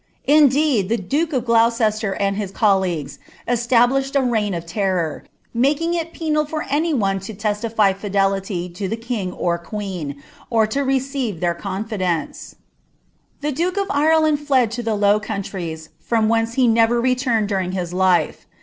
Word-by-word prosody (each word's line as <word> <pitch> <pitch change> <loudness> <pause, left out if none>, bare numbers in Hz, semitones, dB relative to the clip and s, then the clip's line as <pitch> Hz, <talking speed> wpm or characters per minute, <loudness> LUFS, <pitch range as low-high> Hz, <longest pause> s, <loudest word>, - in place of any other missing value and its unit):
Indeed, 285 -7 +4
Ihe 205 -6 -1
duke 315 - 0
of 255 -5 0
Gloureeier 225 -3 +2
and 200 0 +1
bin 205 -1 -2
collMguei 190 -8 0 0.3
cstablishitd 245 +3 +2
n 260 -3 +2
reii^ 210 -5 0
of 170 - -7
terror, 180 -3 -2 0.3
making 285 +8 +1
it 335 -1 -2
penal 305 -2 0
For 305 +1 -4
any 310 +4 0
pereon 195 -8 +1
(o 195 +3 -7
tealiiy 210 -1 +1
fidelity 195 -2 -1 0.2
III 195 - -1
(he 225 - -1
kiiiff 225 -6 -4
or 170 -1 0
queen, 170 -7 -6 0.3
or 225 -2 +3
to 245 +6 -2
receive 265 - -1
their 175 -1 +1
confidence, 190 -2 -3 0.9
The 300 +1 -1
duke 350 +7 -1
ol' 400 - +1
Ireland 310 0 +3
lied 255 -5 +3
to 240 +1 -4
ilic 220 -2 -1
Low 205 +1 +4
Countries, 175 -6 -5
from 225 -2 +1
whence 225 +1 +1
he 255 -2 +3
never 230 +1 +3
rrtunied 250 -3 +1
during 190 -3 -2
his 180 -2 -3
life. 185 -1 +1
220 Hz, 160 wpm, -20 LUFS, 195-265 Hz, 0.9 s, Indeed